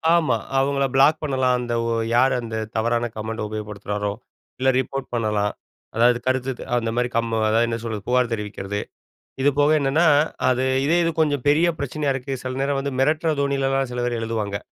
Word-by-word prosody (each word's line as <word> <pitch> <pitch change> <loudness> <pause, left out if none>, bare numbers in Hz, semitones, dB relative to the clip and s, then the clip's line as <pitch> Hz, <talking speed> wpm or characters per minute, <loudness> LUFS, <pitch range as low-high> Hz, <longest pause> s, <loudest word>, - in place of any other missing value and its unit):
ஆமா. 155 -8 +2 0.2
அவங்கள 140 +1 +1
பிளாக் 140 +3 +4
பண்ணலாம். 130 -3 +1
அந்த 120 -1 -3 0.2
ஒ - - 0 0.2
யாரு 130 +2 +4
அந்த 115 -1 -6 0.2
தவறான 115 +1 +1
கமெண்ட 110 +1 -4
உபயோகப்படுத்துகிறாரோ, 105 -1 -4 0.5
இல்ல 130 +1 +3
ரிப்போர்ட் 135 +1 -3
பண்ணலாம். 105 -3 0 0.4
அதாவது 120 +1 +4
கருத்துத் 130 0 -1 0.2
அந்த 115 -1 -1
மாரி 125 0 0
கம் 115 0 0 0.2
அதாவது 115 +2 +3
என்ன 115 0 -2
சொல்றது? 110 -4 -5
புகார் 125 -1 +2
தெரிவிக்கிறது. 105 -2 -4 0.6
இது 145 - +5
போக 145 +1 +4
என்னன்னா, 145 +5 +2 0.4
அது 130 0 +1 0.2
இதே 160 +4 +3
இது 165 - +2
கொஞ்சம் 145 -4 +1
பெரிய 155 +4 +4
பிரச்சனையா 140 +1 -1
இருக்கு. 135 +1 -4
சில 130 0 -4
நேரம் 140 0 0
வந்து 140 0 -3
மிரட்டுற 155 +4 +2
தோணிலலாம், 135 -1 0
சில 125 - -2
பேர் 120 -1 -1
எழுதுவாங்க. 110 -3 -2
125 Hz, 170 wpm, -22 LUFS, 115-140 Hz, 0.6 s, இது